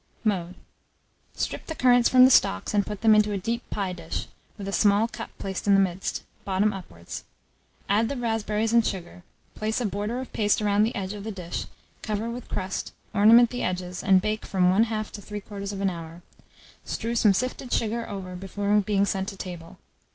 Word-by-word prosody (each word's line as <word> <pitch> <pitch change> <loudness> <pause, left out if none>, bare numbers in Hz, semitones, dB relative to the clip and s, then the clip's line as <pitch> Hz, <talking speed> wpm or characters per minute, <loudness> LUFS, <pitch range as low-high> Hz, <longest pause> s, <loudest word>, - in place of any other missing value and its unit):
Mode. 185 -5 -1 0.8
Strip - - -3
the 320 - -4
currants 245 -3 +5
from 255 0 +8
the 260 - +5
stalks, 95 - +3
and 205 -1 +3
put 210 -2 -5
them 220 -1 +6
into 210 -1 +4
a - - 0
deep 230 +5 -2
pie 195 -3 -2
dish, - - -5 0.3
with 200 -2 -6
a - - -2
small 205 +2 +3
cup 230 0 -7
placed 195 +1 -5
in 200 - +6
the - - +5
midst, 190 -1 -1 0.2
bottom 200 +2 +1
upwards; 85 - -8 0.6
add 215 +3 +2
the 280 - -3
raspberries 225 -1 -1
and 235 -1 +6
sugar; 180 -3 -4 0.3
place 215 +2 -2
a 245 - -1
border 205 +5 -2
of 260 - -7
paste 210 -1 +2
round 205 -1 +3
the 225 +3 0
edge 195 -2 -3
of 205 -1 -7
the 220 - -4
dish, 180 -4 -5 0.4
cover 215 +1 -2
with 245 +1 -8
crust, 190 +1 -3 0.2
ornament 225 +3 +7
the 245 - -3
edges, 180 0 -3
and 190 -1 +5
bake 215 0 -1
from 180 -1 +2
1/2 215 +1 +1
to 205 - -8
3/4 200 -1 -4
hour: 165 0 -9 0.6
strew 230 +1 -3
some 220 -3 +5
sifted 255 +4 -2
sugar 230 +1 -1
over 185 -2 -6
before 200 +2 -1
being 200 -1 +1
sent 190 -1 -1
to 195 - -10
table. 175 -3 -8
205 Hz, 190 wpm, -26 LUFS, 190-225 Hz, 0.8 s, from